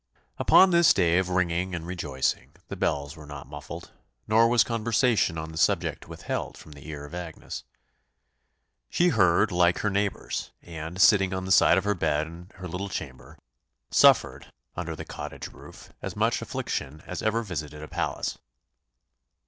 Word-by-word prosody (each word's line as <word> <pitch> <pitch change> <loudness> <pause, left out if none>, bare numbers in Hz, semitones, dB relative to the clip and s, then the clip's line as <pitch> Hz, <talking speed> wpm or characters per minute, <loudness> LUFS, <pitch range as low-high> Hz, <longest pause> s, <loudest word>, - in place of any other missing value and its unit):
Upon 190 0 +6
this 170 -1 +6
day 85 -2 +3
of 95 -1 -1
ringing 90 0 0
and 85 -1 -5
rejoicing 75 -7 -2 0.2
the - - -4
bells 70 +1 -1
were 75 -2 -12
not 70 -2 -8
muffled, 75 +1 -9 0.4
nor 115 +2 +5
was 120 0 +4
conversation 115 -5 +1
on 80 0 -5
the 80 - -5
subject - - +1
withheld - - -5
from 75 - -14
the 70 0 -12
ear 75 -2 -7
of 75 - -12
Agnes! 85 -2 -7 1.3
She 175 +1 +3
heard 90 - +3
like 90 0 +3
her 105 - 0
neighbours; 100 0 -2
and 80 +1 -7
sitting 95 -2 +5
on 95 0 -4
the 95 - -3
side 90 - +6
of 95 - +1
her 105 0 +1
bed 80 -4 0
in 85 +3 -11
her 95 -1 -7
little 95 +3 -4
chamber, 70 -2 -7 0.5
suffered, - - +4 0.2
under - - -4
the - - -7
cottage - - -7
roof, - - -14
as - - -5
much - - +1
affliction 75 +4 -4
as 90 - -5
ever 115 +2 0
visited 75 -6 -6
a - - -7
palace. - - -3
90 Hz, 165 wpm, -26 LUFS, 75-100 Hz, 1.3 s, Upon